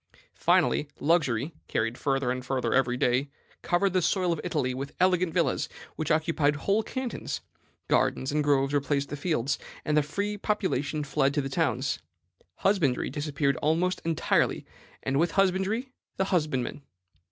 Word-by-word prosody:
"Finally, 150 - +2
luxury, 145 -3 +1
carried 115 +1 -1
further 135 -2 0
and 125 0 -3
further 130 0 -1
every 125 -2 +2
day, 125 +3 +1 0.3
covered 185 +2 +1
the 185 - +3
soil 180 -1 +2
of 160 - -4
Italy 145 -8 -1
with 135 +2 -5
elegant 180 -1 +3
villas, 170 0 +1 0.3
which 155 - -3
occupied 155 -2 +2
whole 200 +9 +1
cantons. 260 +2 -4 0.5
Gardens 130 - +1
and 150 +1 +1
groves 140 -1 +2
replaced 140 0 0
the - - -3
fields, 145 -3 -1 0.3
and 150 - +1
the 150 - +5
free 200 +8 -3
population 155 -8 -1
fled 140 0 +1
to 145 - +2
the 135 - -3
towns. 135 - 0 0.6
Husbandry 170 -11 +1
disappeared 145 -2 0
almost 170 +5 +1
entirely, 165 -2 +1 0.4
and 135 +1 +1
with 170 +1 +2
husbandry 195 +6 +1 0.3
the 190 - +1
husbandman. 150 -9 -1
150 Hz, 150 wpm, -28 LUFS, 135-180 Hz, 0.6 s, the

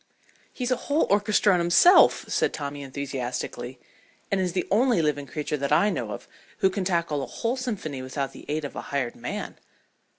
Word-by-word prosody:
"He's 250 -1 -3
a - - +4
whole 290 +3 +3
orchestra 205 0 +3
in 180 - +2
himself," 175 - +6
said - - 0
Tommy 145 -1 -5
enthusiastically, 130 -2 -5 0.5
"and 195 -1 +2
is 180 -2 -1
the 185 - -1
only 235 +1 +3
living 145 -3 0
creature 150 +2 -3
that 140 0 -3
I 200 +8 +4
know - - -3
of - - -7 0.3
who 190 - +3
can 195 0 -2
tackle 170 -5 0
a - - -4
whole 230 +2 -2
symphony 200 - -4
without 135 +1 -3
the - - -12
aid 150 0 -2
of 140 - -7
a - - -4
hired 135 -4 -2
man." - - -6
155 Hz, 190 wpm, -26 LUFS, 140-205 Hz, 0.5 s, himself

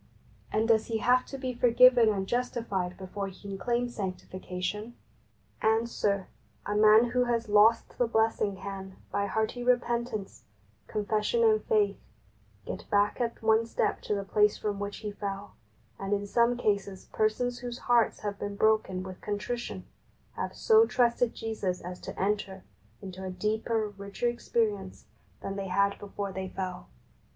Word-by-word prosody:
and 220 +1 +1
does 220 -2 +3
he 225 - -1
have 250 +3 +3
to 275 - -6
be 260 -1 -3
forgiven 245 -1 +6
and 195 -2 0
justified 205 -6 -2
before 195 +1 -5
he 190 - -11
can 200 - -4
claim 240 +4 0
sanctification? 190 0 -5 0.7
Answer: 220 -3 +1 0.4
A 205 - -2
man 215 +3 +6
who 250 0 +2
has 235 -1 0
lost 210 +2 +4
the 245 - +3
blessing 220 -3 +1
can, 190 0 -7 0.2
by 200 0 0
hearty 220 +4 -1
repentance, 240 -4 -1 0.4
confession 215 - 0
and 435 -1 +4
faith, 430 -3 +2 0.7
get - - -7
back 205 +4 +2
at 230 -1 -2
one 220 +1 +3
step - - -1
to 210 - -1
the 200 - -2
place 210 +1 +3
from 205 -1 -3
which 205 0 -4
he 210 - -2
fell, 200 0 -5 0.5
and 195 +1 -2
in 205 0 0
some 235 +3 +2
cases 200 -4 -1
persons 240 +3 0
whose 245 -1 -5
hearts 240 -2 +2
have 205 -1 -4
been 205 0 -4
broken 215 -3 +2
with 185 -1 -9
contrition 235 +4 -4 0.5
have - - -4
so 450 0 +5
trusted 240 -1 +2
Jesus 210 -5 -3
as 180 +1 -7
to - - -8
enter 195 -1 -1 0.4
into 190 0 -7
a 190 - -4
deeper, 215 +3 -1
richer 200 +3 -4
ex 240 0 -8
perience 205 -5 0 0.4
than 195 0 -4
they 195 -1 -3
had 200 +2 +1
before 200 -1 -5
they 190 0 -5
fell. 185 -1 -5
210 Hz, 160 wpm, -29 LUFS, 195-235 Hz, 0.7 s, forgiven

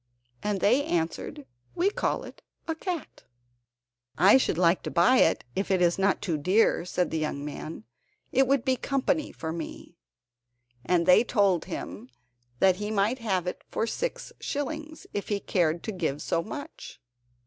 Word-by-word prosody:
And 205 -2 -1
they 250 +7 +4
answered, 160 - -2 0.3
"We 380 +4 +2
call - - -1
it - - -12 0.3
a 325 - 0
cat." 340 -1 -5 0.9
"I 195 +7 +7
should 255 - 0
like 175 0 +3
to - - -4
buy 180 +9 +4
it—if 165 - +1
it 190 -1 +3
is 175 +1 +2
not 195 0 +2
too 165 -6 -1
dear," 185 +3 +3
said 180 0 -1
the 160 - -1
young 145 -2 -3
man; 150 -2 -7 0.5
"it 265 +1 +3
would 270 -2 +2
be 260 -1 +2
company 275 +4 0
for 160 - -5
me." 165 - -8 0.8
And 170 +5 +2
they 180 +5 +7
told 200 -7 +2
him 105 +8 -7 0.5
that 185 +5 +4
he 210 +1 -3
might 215 +4 +1
have 190 -6 -1
it 180 - -5
for - - -1
six - - -4
shillings, 310 +2 -4
if 205 - -3
he 205 -1 0
cared 170 -4 0
to - - -3
give 160 -7 -2
so 165 - 0
much. 285 - -8
195 Hz, 165 wpm, -27 LUFS, 170-255 Hz, 0.9 s, I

